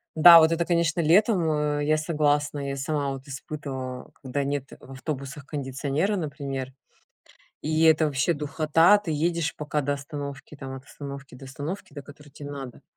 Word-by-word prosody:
Да, 170 +2 +10
вот 160 0 +5
это 165 +1 +1
конечно 170 -1 +1
летом, 180 +1 +4 0.3
э, 145 - -1
я 155 +1 +3
согласна. 145 -2 0
Я 135 - -3
сама 140 +1 -1
вот 135 +1 -8
испытывала, 130 -2 -6
когда 135 +2 -2
нет 140 -1 -3
в 135 - -14
автобусах 140 +1 -6
кондиционера, 145 +6 -1
например, 140 -5 -4 0.9
и 155 +1 +1
это 160 0 +5
вообще 145 +4 +1
духота. 155 +5 +4
Ты 205 -5 -6
едешь 165 +1 0
пока 150 0 -2
до 145 0 0
остановки, 140 0 -7
там 135 -1 -7
от 135 0 -10
остановки 140 -2 -9
до 135 +2 -11
остановки, 145 +4 -6
до 145 - -7
которой 145 +2 -15
те 145 +1 -12
надо. 140 -3 -7
145 Hz, 165 wpm, -26 LUFS, 140-160 Hz, 0.9 s, Да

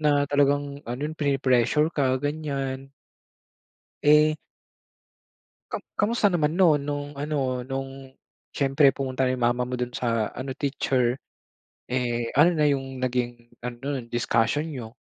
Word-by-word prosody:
na 145 -2 +3
talagang 145 0 +1
ano 125 +3 -4
pine-pressure 140 +1 +2
ka 130 -3 +1
ganyan. 135 -2 -3 1.1
Eh 150 +1 +5 1.3
Kam - - -4 0.2
kamusta 210 -1 +2
naman 155 -2 +1
no'n, 175 -5 +5
no'ng 145 0 -3
ano, 150 +1 -2 0.3
no'ng, 135 0 -6 0.4
siyempre 135 0 +3
pumunta 130 -1 -1
'yung 125 -1 -1
mama 120 +1 +2
mo 125 - -4
do'n 125 0 -2
sa 115 -3 -1
ano, 130 0 -6
teacher. 130 -3 0 0.7
Eh, 120 -2 -1
ano 160 +4 +7
na 150 - +2
'yung 135 -2 -3
naging 120 -2 -2 0.2
ano 125 - -4
non, 135 -4 -3
discussion 120 +4 +1
n'yo? 120 -4 -7
135 Hz, 125 wpm, -25 LUFS, 125-145 Hz, 1.3 s, ano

